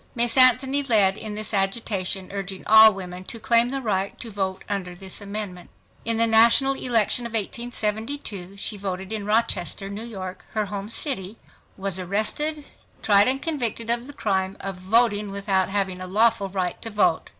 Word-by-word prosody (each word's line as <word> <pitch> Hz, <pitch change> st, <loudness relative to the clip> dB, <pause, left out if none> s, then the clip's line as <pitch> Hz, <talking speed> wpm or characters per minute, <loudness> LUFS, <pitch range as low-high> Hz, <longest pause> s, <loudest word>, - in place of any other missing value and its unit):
Miss 235 Hz, -1 st, +2 dB
Anthony 260 Hz, +2 st, +5 dB
led 210 Hz, -8 st, +3 dB
in 215 Hz, -1 st, -6 dB
this 215 Hz, +1 st, -3 dB
agitation, 195 Hz, -2 st, -1 dB
urging 195 Hz, -1 st, -5 dB
all 220 Hz, 0 st, +8 dB
women 185 Hz, -2 st, -7 dB
to 230 Hz, -, -5 dB
claim 235 Hz, +2 st, +3 dB
the 270 Hz, 0 st, -4 dB
right 195 Hz, -3 st, -2 dB
to 230 Hz, -, -7 dB
vote 190 Hz, -2 st, -3 dB
under 185 Hz, -3 st, -4 dB
this 190 Hz, +2 st, -7 dB
amendment. 200 Hz, -3 st, -6 dB, 0.4 s
In 230 Hz, 0 st, +2 dB
the 230 Hz, -, +4 dB
national 230 Hz, +4 st, +5 dB
election 240 Hz, -2 st, +1 dB
of 235 Hz, -, -13 dB
1872 220 Hz, -2 st, -3 dB
she 205 Hz, +1 st, -3 dB
voted 190 Hz, 0 st, -5 dB
in 210 Hz, -2 st, -4 dB
Rochester, 200 Hz, -4 st, 0 dB
New 205 Hz, +3 st, -5 dB
York, 190 Hz, -5 st, -7 dB
her 215 Hz, -1 st, 0 dB
home 200 Hz, +1 st, -6 dB
city, 225 Hz, -, -2 dB, 0.4 s
was 195 Hz, -1 st, -2 dB
arrested, 220 Hz, -, -1 dB, 0.4 s
tried 205 Hz, 0 st, +5 dB
and 265 Hz, +1 st, 0 dB
convicted 235 Hz, -8 st, -1 dB
of 240 Hz, +2 st, -1 dB
the 285 Hz, -, -10 dB
crime 190 Hz, -6 st, -1 dB
of 195 Hz, -1 st, -5 dB
"voting 210 Hz, +2 st, +2 dB
without 195 Hz, -1 st, 0 dB
having 190 Hz, -2 st, -2 dB
a 185 Hz, -, -5 dB
lawful 215 Hz, +1 st, +2 dB
right 185 Hz, -2 st, -3 dB
to 225 Hz, -, -3 dB
vote." 205 Hz, -6 st, +1 dB
210 Hz, 170 wpm, -24 LUFS, 195-230 Hz, 0.4 s, all